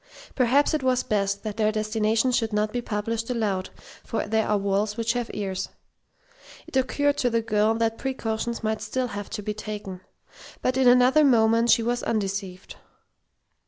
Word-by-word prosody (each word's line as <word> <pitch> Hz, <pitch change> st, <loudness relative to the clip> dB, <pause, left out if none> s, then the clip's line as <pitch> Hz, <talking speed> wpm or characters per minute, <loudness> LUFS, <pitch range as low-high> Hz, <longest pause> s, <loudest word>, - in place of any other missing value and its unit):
Perhaps 270 Hz, +4 st, +3 dB
it 310 Hz, -, 0 dB
was 255 Hz, -1 st, +1 dB
best 200 Hz, -1 st, -1 dB
that 215 Hz, -1 st, -5 dB
their 215 Hz, -1 st, +2 dB
destination 215 Hz, +3 st, +1 dB
should 225 Hz, -2 st, 0 dB
not 210 Hz, 0 st, 0 dB
be 245 Hz, -, -1 dB
published 225 Hz, +1 st, -3 dB
aloud, 205 Hz, -6 st, -1 dB, 0.3 s
for 225 Hz, -, -3 dB
there 220 Hz, +1 st, 0 dB
are 210 Hz, -, +2 dB
walls 200 Hz, +1 st, -1 dB
which 230 Hz, 0 st, 0 dB
have 245 Hz, -1 st, -3 dB
ears. 190 Hz, -2 st, -3 dB, 1.0 s
It -, -, -12 dB
occurred 285 Hz, +2 st, +1 dB
to 245 Hz, -, +2 dB
the 230 Hz, -1 st, 0 dB
girl 215 Hz, 0 st, +2 dB
that 225 Hz, 0 st, -1 dB
precautions 235 Hz, -3 st, -3 dB
might 220 Hz, 0 st, -1 dB
still 250 Hz, +4 st, -2 dB
have 205 Hz, -1 st, -6 dB
to 210 Hz, -, -5 dB
be 210 Hz, -, -2 dB
taken. 210 Hz, -3 st, -7 dB, 0.6 s
But 255 Hz, -, +1 dB
in 260 Hz, -1 st, +3 dB
another 250 Hz, +5 st, +6 dB
moment 230 Hz, -3 st, +4 dB
she 230 Hz, -, +5 dB
was 240 Hz, +1 st, -1 dB
undeceived. 195 Hz, -3 st, -3 dB
220 Hz, 170 wpm, -25 LUFS, 210-245 Hz, 1.0 s, another